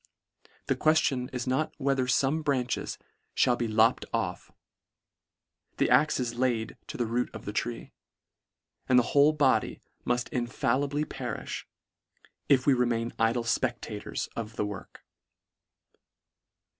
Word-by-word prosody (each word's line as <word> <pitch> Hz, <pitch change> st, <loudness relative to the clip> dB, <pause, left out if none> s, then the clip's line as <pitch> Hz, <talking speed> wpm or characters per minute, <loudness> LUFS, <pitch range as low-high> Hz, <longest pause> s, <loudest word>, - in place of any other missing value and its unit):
The -, -, +1 dB
queftion 140 Hz, -5 st, +2 dB
is 125 Hz, -1 st, -3 dB
not 130 Hz, +4 st, -1 dB
whether 135 Hz, -2 st, +1 dB
fome 140 Hz, +5 st, +2 dB
branches 130 Hz, -4 st, -1 dB, 0.5 s
mall 125 Hz, -, +3 dB
be 120 Hz, -, -2 dB
lopt 110 Hz, +3 st, +3 dB
off -, -, -3 dB, 0.6 s
— -, -, -52 dB
The -, -, +2 dB
ax 150 Hz, -1 st, +4 dB
is 120 Hz, -2 st, -2 dB
laid 120 Hz, -3 st, -1 dB
to -, -, -6 dB
the 120 Hz, -, 0 dB
root 120 Hz, +2 st, -1 dB
of 110 Hz, -, -8 dB
the 105 Hz, -, -4 dB
tree; 115 Hz, +2 st, -3 dB, 1.0 s
and 125 Hz, -, +6 dB
the 125 Hz, -, +6 dB
whole 145 Hz, +1 st, +6 dB
body 145 Hz, -4 st, +2 dB, 0.2 s
mull 120 Hz, -, +1 dB
infallibly 135 Hz, +4 st, 0 dB
perifh, 125 Hz, -6 st, -5 dB, 0.8 s
if 130 Hz, -2 st, +4 dB
we 140 Hz, -, +5 dB
remain 120 Hz, -2 st, 0 dB
idle 115 Hz, +1 st, +2 dB
fpectators 115 Hz, -, -2 dB
of 110 Hz, -1 st, -5 dB
the 105 Hz, -, -1 dB
work. 100 Hz, -2 st, -8 dB
125 Hz, 130 wpm, -28 LUFS, 115-135 Hz, 1.0 s, and